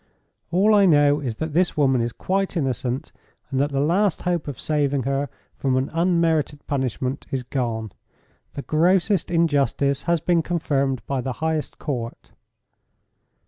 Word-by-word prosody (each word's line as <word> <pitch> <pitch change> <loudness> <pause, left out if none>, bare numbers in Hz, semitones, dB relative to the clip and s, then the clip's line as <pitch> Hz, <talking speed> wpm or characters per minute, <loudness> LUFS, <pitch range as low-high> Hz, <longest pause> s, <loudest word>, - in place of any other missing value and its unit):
"All 195 +6 +4
I 200 -2 +6
know 145 -2 +4
is 125 -6 -3
that 160 +5 -4
this 175 0 +1
woman 135 -4 +3
is 120 0 -1
quite 195 +6 -1
innocent, 130 -3 -2 0.4
and 130 - 0
that 145 +1 +2
the 140 -1 -1
last 175 +6 +1
hope 175 -3 -1
of 145 - -6
saving 145 -3 0
her 140 +2 -1 0.3
from 130 -2 0
an 130 +1 -1
unmerited 165 -4 +1
punishment 130 -1 -2
is 130 -2 -2
gone. 115 -4 -3 0.6
The 140 - -5
grossest 180 +4 +2
injustice 145 -4 +1
has 170 -1 +3
been 170 +1 +2
confirmed 140 -6 -1
by 135 -2 -1
the 130 +1 -3
highest 160 +1 -2
court." 120 -6 -5
145 Hz, 150 wpm, -23 LUFS, 135-170 Hz, 0.6 s, I